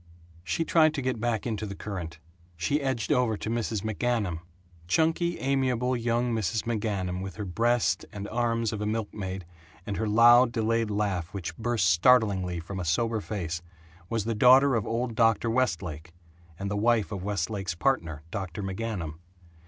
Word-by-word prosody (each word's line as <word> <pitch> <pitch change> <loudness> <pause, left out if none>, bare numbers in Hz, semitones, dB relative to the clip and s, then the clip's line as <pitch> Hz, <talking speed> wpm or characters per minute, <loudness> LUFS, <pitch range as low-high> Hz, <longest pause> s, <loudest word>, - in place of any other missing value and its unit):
She 130 - -1
tried 155 -2 +4
to 140 - -2
get 130 -3 -1
back 115 -1 -1
into 110 -3 -3
the 100 - -6
current. 90 -6 -6 0.4
She 140 - 0
edged 130 -1 -1
over 125 -6 +2
to 110 - -4
Mrs. 115 -3 -2
McGanum. 110 -5 -1 0.5
Chunky, 165 - +1
amiable, 130 -2 0
young 120 0 0
Mrs. 110 0 -1
McGanum 100 -5 -2
with 95 -1 -6
her 105 - -5
breast 115 +6 +1
and 100 0 -6
arms 115 -1 0
of 105 - -4
a 105 - -1
milkmaid, 100 -4 -4 0.4
and 100 - -3
her 110 - -1
loud 120 +3 +6
delayed 115 -1 0
laugh 100 -4 -1
which 85 -3 -4
burst 120 +2 0
startlingly 95 -2 +3
from 95 +3 -6
a - - -2
sober 110 +7 0
face, 85 -6 -4 0.5
was 115 -3 -1
the 115 - 0
daughter 130 +5 +6
of 110 -4 0
old 120 +1 -1
Dr. 115 0 +2
Westlake, 90 - -1 0.4
and 100 +2 -4
the - - -1
wife 110 +1 +2
of 100 -3 -4
Westlake's 95 -2 -2
partner, 85 - -1
Dr. 95 +1 -4
McGanum. 95 -5 -4
110 Hz, 165 wpm, -27 LUFS, 95-120 Hz, 0.5 s, loud